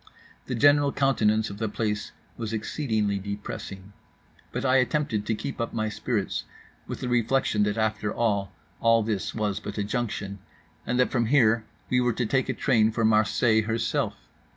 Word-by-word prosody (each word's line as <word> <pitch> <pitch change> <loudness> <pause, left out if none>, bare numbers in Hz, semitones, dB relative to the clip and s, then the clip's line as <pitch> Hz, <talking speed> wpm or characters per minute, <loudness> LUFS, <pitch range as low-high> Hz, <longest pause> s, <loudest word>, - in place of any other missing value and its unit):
The 125 - -2
general 145 +3 +5
countenance 110 -7 +2
of 100 - -9
the 110 -1 -1
place 105 0 -2 0.2
was 115 -1 -4
exceedingly 110 -3 -1
depressing; 100 0 -7 0.6
but - - -3
I 130 0 +4
attempted 125 -5 0
to 110 - +1
keep 115 +4 -5
up 115 - -3
my 110 -1 0
spirits 110 -1 -2 0.4
with - - -6
the - - -2
reflection 120 -2 +1
that 105 +1 -1
after 110 -1 0
all 100 -4 0 0.3
all 115 -1 +4
this 105 -3 -2
was 105 -3 -1
but 105 - -7
a 105 - 0
junction, 100 -3 -3 0.5
and 125 - 0
that 125 - +3
from 120 -3 +1
here 115 -4 +4 0.3
we 125 0 +4
were 125 -1 +2
to 120 +2 -1
take 130 +3 0
a - - +1
train 115 -6 +3
for 110 0 0
Marseilles 110 +1 +3
herself. 115 0 -1
110 Hz, 175 wpm, -26 LUFS, 105-125 Hz, 0.6 s, general